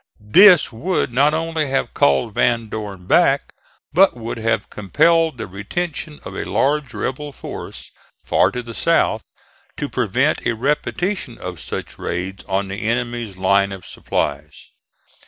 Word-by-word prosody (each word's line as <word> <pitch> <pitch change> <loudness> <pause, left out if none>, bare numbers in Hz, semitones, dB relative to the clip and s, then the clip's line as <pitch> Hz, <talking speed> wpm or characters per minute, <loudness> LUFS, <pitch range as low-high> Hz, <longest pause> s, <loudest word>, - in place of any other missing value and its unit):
This 185 -6 +8
would 125 +1 -1
not 140 +4 +4
only 160 -2 -1
have 135 - -1
called 125 -5 +2
Van 115 -1 +1
Dorn 105 -4 -6
back, - - +3 0.4
but 185 -4 +5
would 115 0 -5
have 115 0 -1
compelled 160 - +2
the 115 - -4
retention 145 - -5
of - - -7
a - - -3
large 140 -2 0
rebel 145 +3 -3
force - - -9 0.3
far - - +3
to 125 - -5
the 115 -1 -8
south - - +1 0.5
to - - -2
prevent - - 0
a 120 - +1
repetition 150 - -2
of 90 -2 -7
such - - -6
raids 90 +2 -4
on 100 0 -1
the 95 +3 -5
enemy's 120 -2 -2
line 100 +1 +2
of 95 -2 -8
supplies. 75 +1 -4
120 Hz, 145 wpm, -20 LUFS, 100-150 Hz, 0.5 s, This